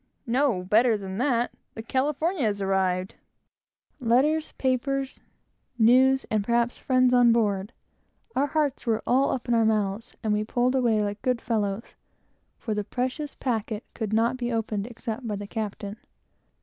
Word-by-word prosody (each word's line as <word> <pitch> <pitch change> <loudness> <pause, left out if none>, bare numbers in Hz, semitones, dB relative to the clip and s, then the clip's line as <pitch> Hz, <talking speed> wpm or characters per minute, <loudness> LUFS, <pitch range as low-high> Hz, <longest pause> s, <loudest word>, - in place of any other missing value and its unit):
"No; 245 -6 +1
better 220 +4 +3
than 195 0 -6
that. 245 -2 +1 0.2
The 225 - -6
California 295 +8 0
has 210 -4 0
arrived." 190 -1 0 0.9
Letters, 280 +6 +2
papers, 270 +1 -1 0.6
news, 260 +4 +5
and, 215 -2 +1
perhaps, 235 +2 0
friends, 255 -1 +3
on 245 -1 +6
board! 205 -3 +1 0.6
Our 280 +2 +2
hearts 290 -4 -1
were 225 -1 +1
all 265 +3 +3
up 255 -1 -3
in 240 - +1
our 230 -1 +4
mouths, 215 -1 -1
and 215 -1 +1
we 210 0 +1
pulled 245 +3 +1
away 235 -5 +2
like 205 0 -4
good 255 -2 0
fellows; 215 -2 -2 0.6
for 220 - -3
the 210 0 -1
precious 260 +7 -3
packet 220 -3 -2
could 220 -3 -4
not 230 +3 +2
be 245 -1 -2
opened 220 -2 -2
except 235 0 -6
by 210 - -2
the 205 0 -6
captain. 205 -1 -5
230 Hz, 155 wpm, -26 LUFS, 210-255 Hz, 0.9 s, on